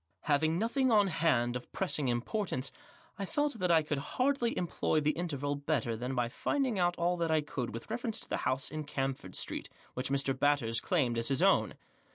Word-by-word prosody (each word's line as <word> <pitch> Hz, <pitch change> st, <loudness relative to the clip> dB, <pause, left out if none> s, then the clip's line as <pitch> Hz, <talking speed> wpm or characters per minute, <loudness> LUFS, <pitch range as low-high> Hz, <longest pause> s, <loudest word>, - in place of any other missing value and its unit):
Having 155 Hz, +2 st, +2 dB
nothing 245 Hz, +6 st, +1 dB
on 210 Hz, -2 st, +6 dB
hand 140 Hz, -8 st, +2 dB
of 125 Hz, -, -6 dB
pressing 155 Hz, -7 st, 0 dB
importance, 130 Hz, -, -1 dB, 0.5 s
I 200 Hz, -, -1 dB
felt 290 Hz, +2 st, -1 dB
that 180 Hz, -, +1 dB
I 165 Hz, -2 st, +5 dB
could 150 Hz, -2 st, -2 dB, 0.2 s
hardly 255 Hz, -2 st, +2 dB
employ 170 Hz, -2 st, 0 dB
the 150 Hz, 0 st, +2 dB
interval 145 Hz, -4 st, -2 dB
better 140 Hz, -5 st, -1 dB
than 125 Hz, +4 st, -3 dB
by 120 Hz, -1 st, +1 dB
finding 250 Hz, -, -1 dB
out 175 Hz, 0 st, +2 dB
all 175 Hz, +1 st, +1 dB
that 170 Hz, -1 st, 0 dB
I 160 Hz, -1 st, +3 dB
could 135 Hz, -5 st, -4 dB
with 115 Hz, -, -7 dB
reference 230 Hz, -1 st, -2 dB
to -, -, -10 dB
the -, -, -1 dB
house 130 Hz, +2 st, -1 dB
in 155 Hz, 0 st, -3 dB
Camford 135 Hz, -9 st, -3 dB
Street -, -, -3 dB, 0.2 s
Which 130 Hz, +1 st, -3 dB
Mr. 135 Hz, -1 st, +1 dB
Batters 130 Hz, -5 st, +2 dB
claimed 125 Hz, -10 st, +1 dB
as 115 Hz, -, +1 dB
his 135 Hz, -2 st, +2 dB
own. -, -, +4 dB
150 Hz, 200 wpm, -32 LUFS, 130-180 Hz, 0.5 s, on